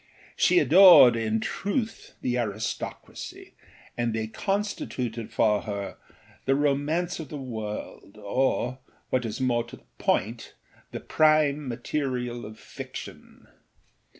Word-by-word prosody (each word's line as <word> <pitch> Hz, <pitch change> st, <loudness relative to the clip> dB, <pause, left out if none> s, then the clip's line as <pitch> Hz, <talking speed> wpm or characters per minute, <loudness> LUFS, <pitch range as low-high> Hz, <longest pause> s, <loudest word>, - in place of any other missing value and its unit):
She -, -, +3 dB
adored, 180 Hz, -, +8 dB
in 110 Hz, -1 st, 0 dB
truth, 220 Hz, -, -3 dB
the 125 Hz, -, -1 dB
aristocracy, 110 Hz, -1 st, -5 dB, 0.4 s
and 120 Hz, -2 st, -1 dB
they 110 Hz, -1 st, -1 dB
constituted 125 Hz, -, -3 dB
for 105 Hz, -2 st, +2 dB
her 100 Hz, -4 st, -5 dB, 0.5 s
the 135 Hz, -, +3 dB
romance 145 Hz, +5 st, 0 dB
of 160 Hz, -, -7 dB
the 150 Hz, -, -6 dB
world 110 Hz, -5 st, -7 dB
or, 125 Hz, +4 st, 0 dB, 0.3 s
what 125 Hz, -1 st, +1 dB
is 110 Hz, +1 st, -4 dB
more 120 Hz, -2 st, +1 dB
to 115 Hz, -, -11 dB
the -, -, -24 dB, 0.2 s
point, 115 Hz, +5 st, -1 dB, 0.4 s
the -, -, -6 dB
prime 155 Hz, -2 st, +3 dB
material 125 Hz, -2 st, -3 dB
of 110 Hz, 0 st, -11 dB
fiction. -, -, -10 dB
125 Hz, 120 wpm, -26 LUFS, 110-150 Hz, 0.5 s, adored